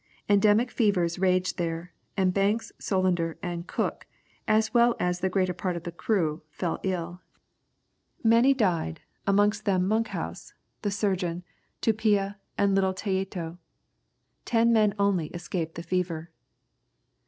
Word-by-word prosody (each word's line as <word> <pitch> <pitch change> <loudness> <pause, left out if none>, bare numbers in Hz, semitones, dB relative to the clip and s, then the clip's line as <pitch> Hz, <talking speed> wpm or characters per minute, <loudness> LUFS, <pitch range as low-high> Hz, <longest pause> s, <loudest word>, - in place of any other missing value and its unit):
Endemic 210 +4 +4
fevers 185 -6 +1
raged 185 -1 +1
there; 170 +1 -3 0.2
and 185 -2 +2
Banks, 200 +4 +1
Solander, 180 -4 0
and 175 -1 -4
Cook, - - -2 0.4
as 220 +2 +2
well 235 -1 +5
as 180 0 0
the 190 - 0
greater 185 -1 +1
part 180 0 -2
of 170 - -5
the 175 - -5
crew, 170 -4 0
fell 170 +2 -3
ill. 180 -1 -3 1.0
Many 235 +4 +5
died, 175 - 0 0.3
amongst 205 +1 +3
them 185 -3 +2
Monkhouse, 220 +2 -2 0.3
the 205 - 0
surgeon, 185 -4 -1 0.4
Tupia, 205 -2 +2 0.2
and 200 -1 +3
little 190 -1 +2
Tayeto. 190 -4 -3 0.8
Ten 235 0 +3
men 215 -2 +3
only 200 -5 +2
escaped 175 -2 -4
the 170 - -6
fever. 170 -2 -2
190 Hz, 130 wpm, -27 LUFS, 175-205 Hz, 1.0 s, well